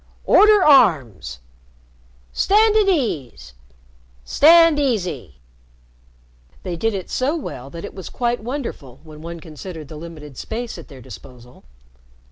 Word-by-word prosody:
"Order 420 -2 +5
arms! 125 - +3 0.9
"Stand 430 +2 +3
at 425 -2 +3
ease! 135 - -2 0.7
"Stand 330 - +5
easy!" 180 - -2 1.3
They 180 -2 -4
did 225 +5 -1
it 190 - -6
so 270 +5 0
well 135 - -8
that 170 +5 -8
it - - -9
was 190 -3 -9
quite 240 0 -2
wonderful 225 - -6
when 155 -1 -13
one 170 +1 -8
considered 160 -1 -10
the 155 - -9
limited 150 -4 -11
space 235 +1 -6
at - - -12
their 135 -4 -13
disposal. 125 0 -14
170 Hz, 125 wpm, -20 LUFS, -, 1.3 s, Order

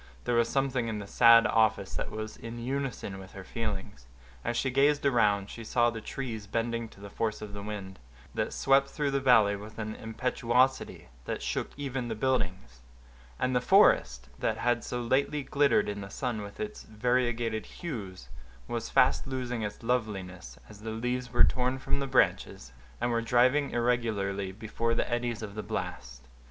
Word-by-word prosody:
There 120 - 0
was 120 0 +3
something 135 -3 0
in 110 -2 -2
the 100 - -6
sad 115 +2 +7
office 110 -3 +2
that - - -3
was 110 0 -6
in 115 +1 -8
unison 125 -5 -3
with 95 0 -12
her 95 - -8
feelings. 95 - -5 0.4
As 120 - -1
she 130 +1 0
gazed 140 +2 +3
around, 105 -7 +3
she 115 - -8
saw 120 +1 +2
the 115 -1 -6
trees 110 -4 -5
bending 115 +1 -2
to - - -17
the 100 0 -10
force 110 0 -2
of 105 -1 -8
the 100 - -6
wind, 100 -2 -6 0.3
that - - -1
swept 135 0 +3
through 145 -2 -1
the 140 - +1
valley 115 -6 +5
with 105 +2 -10
an 110 -1 -4
impetuosity 125 - 0 0.2
that - - -4
shook - - -2
even 135 -3 -3
the 110 - -3
buildings; 95 - -1 0.6
and 125 0 0
the 125 - +3
forest, 65 - +4
that - - 0
had 120 -1 +1
so 125 0 -3
lately 140 +4 +1
glittered 145 +1 +3
in 100 0 -4
the 100 - -7
sun 110 +2 -3
with 100 0 -9
its 215 0 -5
variegated 120 -1 0
hues, 105 - -7 0.4
was 120 -1 -3
fast 130 - +3
losing 125 -3 -3
its 105 +2 -5
loveliness, 95 - -3
as 105 -1 -13
the 110 - -5
leaves 125 +2 -2
were 120 - +5
torn 130 +1 +2
from 140 +1 -2
the 140 - -2
branches, 95 - +1 0.3
and 120 - 0
were 115 0 +1
driving 125 +5 +3
irregularly 110 -5 0
before 110 +3 -2
the - - 0
eddies 120 -2 -1
of 100 -2 -6
the 105 - -4
blast. 60 -10 -6
115 Hz, 180 wpm, -29 LUFS, 105-125 Hz, 0.6 s, sad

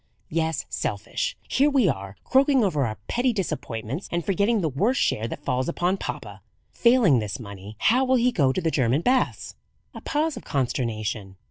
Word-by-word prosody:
"Yes, 160 0 -1
selfish. - - -3
Here 285 +2 +3
we 270 -8 +3
are, 100 - -3
croaking 270 -1 +4
over 150 - +1
our 110 - -5
petty 250 +1 +1
disappointments, 155 - -4
and 170 -1 -1
forgetting 205 +3 +2
the 165 - +1
worst 205 - +1
share 110 +1 +1
that 145 +5 -8
falls 130 +2 0
upon 180 +3 0
papa. - - -6 0.3
Failing 235 - +4
this 105 -3 -4
money, 100 -1 -9
how 245 - +3
will 260 0 +3
he 250 0 +3
go 140 - +2
to 185 - -2
the 165 -1 0
German 130 +1 +2
baths?" 255 +6 0 0.4
A - - -9
pause 305 0 -1
of - - -8
consternation. 110 -7 -2
165 Hz, 175 wpm, -25 LUFS, -, 0.4 s, croaking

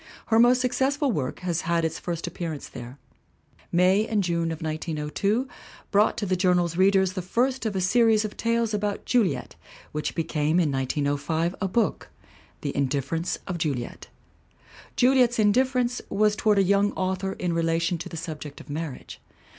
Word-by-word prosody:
Her 225 0 +4
most 245 +2 +5
successful 270 +3 +1
work 135 - -3
has 175 -2 -1
had 170 0 0
its 160 0 -3
first 170 -2 -4
appearance 170 -3 -5
there. 125 +1 -9 0.7
May 185 +5 +3
and 210 -3 +1
June 170 -2 0
of 160 - -5
1902 160 - -2 0.4
brought 205 +2 +3
to 205 - -2
the 185 -1 +1
Journal's 180 -2 +2
readers 190 0 +3
the 185 - -3
first 245 +7 0
of 205 - -3
a 190 - 0
series 220 +2 +3
of 210 - -6
tales 230 -1 0
about 205 -1 -2
Juliet 190 - 0 0.4
which 150 0 -3
became, 160 0 +1
in 160 -5 +2
1905, 145 +5 -1
a 195 - +1
book, 225 +5 -1 0.5
The 140 - -3
Indifference 140 +5 -1
of 180 -3 -4
Juliet. 135 -7 -3 0.9
Juliet's 250 -1 +4
indifference 245 +3 +2
was 210 0 +2
toward 210 -1 +2
a 195 - +5
young 200 +2 +2
author 190 +1 -2
in 175 -2 -2
relation 165 +1 0
to - - -6
the 165 - -7
subject 155 -3 -7
of 145 - -11
marriage. 155 -3 -6
180 Hz, 160 wpm, -25 LUFS, 160-215 Hz, 0.9 s, most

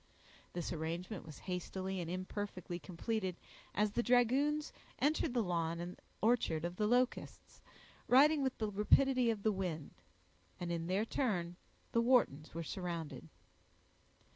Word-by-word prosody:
This 175 -1 -3
arrangement 170 +4 -4
was 155 - -10
hastily 190 +1 -3
and 165 - -4
imperfectly 185 -1 -4
completed, 190 +1 -2 0.4
as 210 0 +2
the 240 - +1
dragoons 260 +5 +3 0.2
entered 295 -2 +1
the 235 - +3
lawn 170 -2 -1
and 175 +1 -6 0.2
orchard 215 -9 +2
of 175 +1 -4
the 210 - +2
Locusts, 250 +2 0 0.5
riding 290 +4 +6
with 265 -2 0
the 215 -2 -1
rapidity 250 +5 +4
of 215 -3 -1
the 220 - +4
wind; 180 -6 -3 0.7
and 175 -1 -3
in 165 -1 -2
their 195 +4 +1
turn 180 -9 -1 0.4
the 230 - +3
Whartons 230 - +3
were 165 - -2
surrounded. 170 -2 -5
195 Hz, 140 wpm, -36 LUFS, 175-240 Hz, 0.7 s, riding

